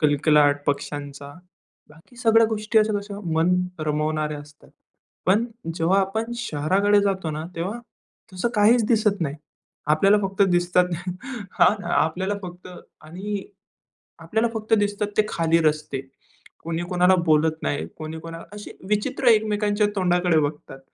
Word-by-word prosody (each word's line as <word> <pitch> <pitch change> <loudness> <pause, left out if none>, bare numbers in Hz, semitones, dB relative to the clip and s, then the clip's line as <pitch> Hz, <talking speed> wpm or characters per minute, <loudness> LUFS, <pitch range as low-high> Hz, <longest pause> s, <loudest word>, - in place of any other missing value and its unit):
कलकलाट 145 -1 +3
पक्ष्यांचा. 145 0 -4 0.6
बाकी 160 +11 -20
सगळ्या 225 -1 +4
गोष्टी 220 0 +1
अशा 215 0 +2
कशा 200 0 -8
मन 165 +3 +3 0.3
रमवणाऱ्या 150 0 -1
असतात. 145 0 -17 0.6
पण 205 +5 +3 0.3
जेव्हा 175 +4 +2
आपण 220 +5 -2
शहराकडे 200 0 +2
जातो 190 -5 -1
ना, 155 +1 -5
तेव्हा 190 +8 -3 0.5
तसं 185 +5 -1
काहीच 220 +2 +4
दिसत 215 -3 +2
नाही. 145 -4 -2 0.6
आपल्याला 195 +6 +4
फक्त 195 +1 0
दिसतात 175 0 +3 0.7
हां, 205 -1 +4
आपल्याला 185 +5 +1
फक्त 180 0 -9 0.4
आणि 195 +5 -5 0.8
आपल्याला 225 +1 0
फक्त 220 0 +1
दिसतात 205 0 0
ते 215 - +4
खाली 165 -2 +2
रस्ते. 150 -3 0 0.6
कुणी 165 +1 -3
कुणाला 180 0 +4
बोलत 160 0 +3
नाही, 145 - -2
कोणी 155 0 -6
कोणाला 165 0 -9
अशी 210 0 -9 0.2
विचित्र 250 +6 -1
एकमेकांच्या 210 -1 +2
तोंडाकडे 180 -3 +2
बघतात 145 -2 -4
180 Hz, 130 wpm, -23 LUFS, 155-210 Hz, 0.8 s, सगळ्या